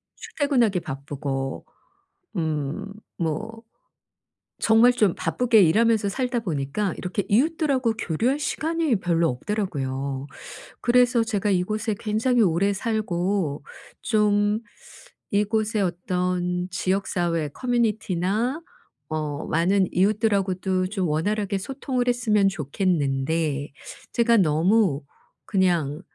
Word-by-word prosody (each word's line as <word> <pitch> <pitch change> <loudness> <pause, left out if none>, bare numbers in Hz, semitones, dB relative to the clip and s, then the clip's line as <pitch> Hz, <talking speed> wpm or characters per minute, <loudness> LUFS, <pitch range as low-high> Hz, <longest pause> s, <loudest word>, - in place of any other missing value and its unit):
출퇴근하기 245 -10 0
바쁘고 140 -3 -4 0.7
음 155 +3 -2 0.3
뭐 215 +8 -3 1.0
정말 225 +2 +5
좀 210 -7 +2
바쁘게 235 -3 +2
일하면서 215 +4 +3
살다 250 +3 -1
보니까 170 +1 -2
이렇게 185 +2 -3
이웃들하고 265 -1 +2
교류할 230 - 0
시간이 315 -1 0
별로 170 -2 +2
없더라고요. 140 - -3 0.5
그래서 245 -1 +3
제가 210 -3 -1
이곳에 215 +4 0
굉장히 225 +3 +1
오래 190 +2 +2
살고 190 - -1 0.4
좀 210 -1 +2 0.7
이곳에 215 +1 +1
어떤 180 0 -1
지역사회 175 -4 -1
커뮤니티나 220 - -1 0.5
어 155 -2 -3
많은 185 +3 +2
이웃들하고도 190 -2 +1
좀 190 -4 -2
원활하게 200 +6 0
소통을 255 +2 -3
했으면 220 -5 +3
좋겠는데 150 -3 -1 0.4
제가 235 0 +3
너무 170 -1 +3 0.4
그냥 170 -7 +1
195 Hz, 245 characters per minute, -24 LUFS, 165-225 Hz, 1.0 s, 정말